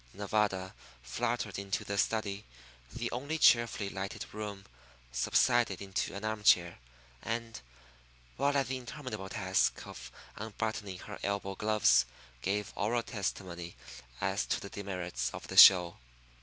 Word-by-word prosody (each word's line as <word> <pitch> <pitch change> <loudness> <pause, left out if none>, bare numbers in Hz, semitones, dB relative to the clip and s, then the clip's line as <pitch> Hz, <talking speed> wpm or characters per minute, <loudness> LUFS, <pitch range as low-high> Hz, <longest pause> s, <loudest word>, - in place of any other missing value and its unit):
Nevada 100 -2 0 0.3
fluttered 110 - -2
into 100 -1 -2
the 100 - -3
study, 105 -1 0 0.5
the 120 - -4
only 140 +6 -3
cheerfully 115 -7 +4
lighted 100 0 -5
room, 105 -2 -6 0.5
subsided 100 - +2
into 95 -1 -3
an 100 +2 -5
arm 110 -1 -2
chair, 85 -4 +4 0.4
and, 115 - -4 0.7
while 140 +2 +1
at 135 - +2
the 130 0 -2
interminable 130 -6 -7
task 95 -3 0
of 60 -1 -10 0.3
unbuttoning 110 -3 -4
her 105 +2 -9
elbow 100 -1 -2
gloves, 105 +1 +3 0.3
gave 100 +4 -2
oral 115 +3 0
testimony 90 -5 -5 0.4
as - - 0
to - - 0
the - - -9
demerits 90 -10 -3
of - - -8
the - - -5
"show." 90 -3 +9
100 Hz, 130 wpm, -32 LUFS, 95-115 Hz, 0.7 s, show